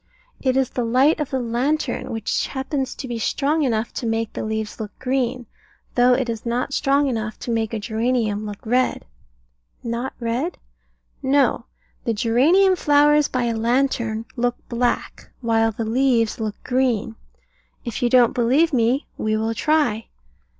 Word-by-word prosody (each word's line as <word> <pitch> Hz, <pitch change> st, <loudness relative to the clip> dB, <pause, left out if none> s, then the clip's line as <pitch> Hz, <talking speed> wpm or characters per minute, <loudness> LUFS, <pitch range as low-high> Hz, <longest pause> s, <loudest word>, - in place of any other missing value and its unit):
It 260 Hz, -1 st, +1 dB
is 265 Hz, -2 st, +1 dB
the 245 Hz, -, -2 dB
light 260 Hz, +8 st, +3 dB
of 300 Hz, -, -2 dB
the 265 Hz, -, -1 dB
lantern, 250 Hz, +4 st, -1 dB
which 225 Hz, -2 st, -1 dB
happens 265 Hz, 0 st, -3 dB
to 260 Hz, -, -6 dB
be 240 Hz, -2 st, -4 dB
strong 295 Hz, +7 st, 0 dB
enough 230 Hz, -5 st, 0 dB
to 235 Hz, -, -3 dB
make 225 Hz, 0 st, -1 dB
the -, -, -4 dB
leaves 220 Hz, -1 st, -3 dB
look 210 Hz, -2 st, -7 dB
green, 255 Hz, -1 st, -1 dB, 0.5 s
though 245 Hz, 0 st, +5 dB
it 260 Hz, -1 st, -1 dB
is 225 Hz, -2 st, -4 dB
not 245 Hz, +3 st, -2 dB
strong 280 Hz, +1 st, +2 dB
enough 220 Hz, -4 st, -3 dB
to 240 Hz, -, -3 dB
make 225 Hz, -1 st, 0 dB
a 225 Hz, -, -2 dB
geranium 220 Hz, -1 st, -1 dB
look 210 Hz, 0 st, -8 dB
red. 250 Hz, +3 st, +1 dB, 0.8 s
Not 235 Hz, +3 st, -3 dB
red? 245 Hz, +9 st, -2 dB, 0.6 s
No; 265 Hz, -3 st, +2 dB, 0.4 s
the 230 Hz, -, -1 dB
geranium 305 Hz, -, +4 dB
flowers 295 Hz, -2 st, +4 dB
by 250 Hz, -1 st, -1 dB
a 235 Hz, -1 st, 0 dB
lantern 230 Hz, -1 st, 0 dB
look 245 Hz, 0 st, 0 dB
black, 240 Hz, 0 st, -2 dB
while 225 Hz, -1 st, +2 dB
the 225 Hz, +1 st, -4 dB
leaves 235 Hz, -1 st, +1 dB
look 215 Hz, -2 st, -3 dB
green. 245 Hz, -4 st, 0 dB, 0.7 s
If 235 Hz, -2 st, -4 dB
you 245 Hz, -, +2 dB
don't 245 Hz, -2 st, +5 dB
believe 270 Hz, +7 st, +2 dB
me, 245 Hz, +3 st, +2 dB
we 215 Hz, 0 st, 0 dB
will 220 Hz, +1 st, -1 dB
try. 285 Hz, -6 st, +1 dB
240 Hz, 160 wpm, -22 LUFS, 225-265 Hz, 0.8 s, though